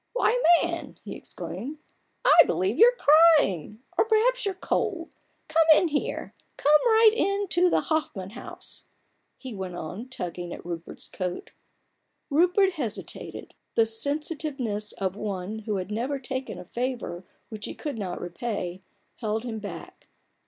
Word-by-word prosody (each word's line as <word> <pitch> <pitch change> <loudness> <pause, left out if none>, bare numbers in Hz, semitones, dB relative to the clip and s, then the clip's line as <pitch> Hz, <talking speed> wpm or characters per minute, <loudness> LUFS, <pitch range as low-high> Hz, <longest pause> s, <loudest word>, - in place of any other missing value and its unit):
"Why, - - +2 0.2
man," 340 0 -4
he - - -7
exclaimed, 290 +6 -7 0.3
" - - -36
I - - +7
believe 380 - 0
you're 485 +3 +7
crying! 290 - +4
or - - +4
perhaps 450 +2 +2
you're 390 - -2
cold 365 -2 -2
I 310 - -21
Come 325 0 +5
in 350 - 0
here, 310 +12 -2 0.2
come 300 +1 +5
right 445 -1 +7
in 400 -2 0
to 360 +1 +3
the - - +2
Hoffman 265 - -2
House! 245 - -11 0.3
" - - -47
he 260 -3 -6
went 190 -3 -5
on, 180 +10 -6
tugging 175 -6 -5
at - - -10
Rupert's 170 -1 -7
coat, 180 -1 -5 0.8
Rupert 360 +6 +4
hesitated. 245 - -5 0.2
The 225 - +5
sensitiveness 270 -3 -1
of 190 -1 -3
one 205 0 -4
who 215 -1 -3
had 190 +1 -4
never 250 +6 -1
taken 260 -5 -5
a 180 - -9
favour 240 -5 -4 0.3
which 215 -2 -6
he - - -7
could 290 -7 -5
not 185 -3 -4
repay, 180 -1 -4 0.4
held 220 -1 -2
him 225 -3 -4
back. 205 -1 -9
250 Hz, 150 wpm, -26 LUFS, 200-330 Hz, 0.8 s, I